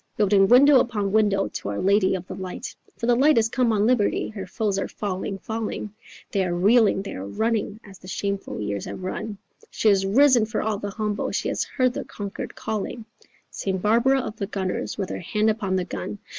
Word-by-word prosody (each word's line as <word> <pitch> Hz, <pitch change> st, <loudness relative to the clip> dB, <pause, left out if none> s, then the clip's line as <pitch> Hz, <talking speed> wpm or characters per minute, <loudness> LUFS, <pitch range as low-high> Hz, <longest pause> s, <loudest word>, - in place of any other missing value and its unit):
Building 200 Hz, -2 st, +4 dB
window 265 Hz, +4 st, +7 dB
upon 210 Hz, -5 st, -1 dB
window 205 Hz, -2 st, +2 dB
to -, -, -6 dB
our 100 Hz, -, -3 dB
lady 195 Hz, 0 st, +3 dB
of 185 Hz, -1 st, -5 dB
the -, -, -7 dB
light. 185 Hz, -1 st, -6 dB, 0.2 s
For -, -, -3 dB
the 240 Hz, -, +4 dB
light 280 Hz, +4 st, +4 dB
is 225 Hz, 0 st, +3 dB
come 240 Hz, -1 st, +1 dB
on 210 Hz, -1 st, +2 dB
Liberty, 235 Hz, -3 st, +1 dB
her 195 Hz, -3 st, -7 dB
foes 200 Hz, 0 st, -1 dB
are -, -, -2 dB
falling, 195 Hz, -1 st, -4 dB
falling, 220 Hz, -1 st, -4 dB, 0.4 s
They 195 Hz, -2 st, +1 dB
are 175 Hz, -1 st, -1 dB
reeling, 205 Hz, +1 st, +4 dB
they 200 Hz, -, -6 dB
are 95 Hz, +1 st, -6 dB
running, 220 Hz, -, -1 dB
as 195 Hz, -2 st, -14 dB
the 185 Hz, -, -14 dB
shameful 200 Hz, +1 st, -3 dB
years 100 Hz, -1 st, -3 dB
have 185 Hz, -, -7 dB
run, 205 Hz, +3 st, -4 dB, 0.3 s
She 220 Hz, -, +2 dB
is 195 Hz, -1 st, +3 dB
risen 240 Hz, +2 st, +4 dB
for 215 Hz, -, -2 dB
all 215 Hz, -2 st, -1 dB
the 205 Hz, -, -4 dB
humble, 210 Hz, 0 st, -2 dB
she -, -, -1 dB
has -, -, -1 dB
heard 255 Hz, -2 st, 0 dB
the -, -, -4 dB
conquered 200 Hz, -1 st, -7 dB
calling, 220 Hz, +1 st, -4 dB, 0.5 s
St. 190 Hz, -1 st, -2 dB
Barbara 235 Hz, +7 st, +3 dB
of 220 Hz, -3 st, -6 dB
the 200 Hz, -, -3 dB
Gunners, 190 Hz, -3 st, -3 dB
with 195 Hz, -3 st, -3 dB
her -, -, -4 dB
hand 210 Hz, +5 st, +1 dB
upon 200 Hz, -4 st, -2 dB
the 185 Hz, -1 st, 0 dB
gun. 190 Hz, +3 st, -5 dB
205 Hz, 210 wpm, -24 LUFS, 195-225 Hz, 0.5 s, window